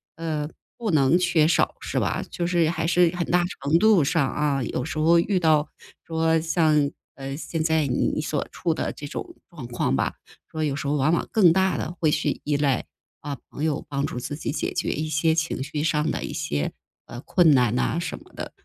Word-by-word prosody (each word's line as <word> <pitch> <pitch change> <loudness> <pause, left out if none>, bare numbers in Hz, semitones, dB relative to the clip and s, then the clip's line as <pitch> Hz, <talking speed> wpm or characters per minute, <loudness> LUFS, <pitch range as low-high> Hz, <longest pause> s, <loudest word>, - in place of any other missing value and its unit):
呃， 155 -2 -3 0.3
不 230 -3 -3
能 150 +1 +4
缺 160 -4 +3
少 170 - +2
是 - - -2
吧？ - - -1
就 170 - -2
是 175 -2 +2
还 165 -1 -2
是 175 0 +3
很 175 -1 -1
大 175 0 +3 0.2
程 145 +4 +3
度 215 -7 +5
上 140 -1 +2
啊， 140 -2 0
有 125 - -3
时 155 +3 -5
候 165 +2 +5
遇 185 +2 +1
到 155 -3 +3 0.4
说 160 0 +1
像， 155 -3 +2 0.3
呃， 135 0 -6
现 165 0 -3
在 160 -1 +2
你 125 - 0
所 150 -1 -2
处 170 -2 -1
的 - - -2
这 145 - -9
种 345 - -7
状 150 -9 -9
况 120 - -1
吧， - - 0 0.4
说 155 -1 -2
有 145 -3 0
时 145 - -4
候 145 - +1
往 150 +3 +2
往 170 - 0
更 180 -7 +5
大 190 -4 +2
地 120 +9 -3
会 160 - +3
去 - - -1
依 145 -1 0
赖， 140 -3 +1 0.4
啊， 145 -1 -5
朋 145 - -5
友 155 -3 -1
帮 140 -1 -2
助 125 - -4
自 130 +4 -5
己 150 - -4
解 150 - -2
决 - - -1
一 155 +2 -2
些 160 +1 +2
情 160 -4 -1
绪 150 +1 -3
上 155 -1 +1
的 - - -3
一 - - -5
些， 75 0 -2 0.3
呃， 120 - -9
困 170 +1 +4
难 125 -4 +3
啊 160 - 0
什 170 - -4
么 - - -20
的。 - - -6
155 Hz, 235 characters per minute, -24 LUFS, 145-170 Hz, 0.4 s, 度